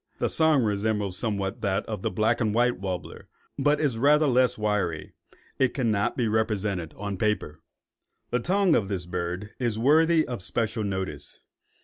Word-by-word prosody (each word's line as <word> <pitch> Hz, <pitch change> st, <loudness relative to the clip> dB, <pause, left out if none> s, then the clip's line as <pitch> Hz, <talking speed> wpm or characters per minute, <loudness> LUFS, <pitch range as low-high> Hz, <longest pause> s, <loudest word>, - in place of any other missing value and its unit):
The -, -, 0 dB
song 160 Hz, -5 st, +3 dB
resembles 105 Hz, -2 st, -1 dB
somewhat 100 Hz, 0 st, -2 dB
that 100 Hz, -2 st, 0 dB
of 105 Hz, -4 st, -5 dB
the -, -, -1 dB
black 110 Hz, +6 st, +1 dB
and 110 Hz, -2 st, 0 dB
white 120 Hz, -1 st, +2 dB
warbler, 95 Hz, -2 st, -6 dB, 0.3 s
but 145 Hz, +2 st, +2 dB
is 140 Hz, -7 st, 0 dB
rather 150 Hz, +4 st, +4 dB
less 130 Hz, -2 st, +3 dB
wiry. 105 Hz, -8 st, -2 dB, 0.5 s
It 130 Hz, -2 st, +2 dB
cannot 110 Hz, -6 st, 0 dB
be 120 Hz, -3 st, +1 dB
represented 105 Hz, -6 st, -1 dB
on 100 Hz, -1 st, -4 dB
paper. 90 Hz, -7 st, -1 dB, 0.7 s
The 125 Hz, -, +1 dB
tongue 185 Hz, +5 st, +2 dB
of 100 Hz, -, +1 dB
this 95 Hz, -3 st, -3 dB
bird 90 Hz, +3 st, -4 dB
is 120 Hz, -4 st, -1 dB
worthy 155 Hz, +6 st, +4 dB
of 120 Hz, -6 st, -5 dB
special 110 Hz, +3 st, -1 dB
notice. 95 Hz, -7 st, -5 dB
110 Hz, 160 wpm, -26 LUFS, 95-125 Hz, 0.7 s, rather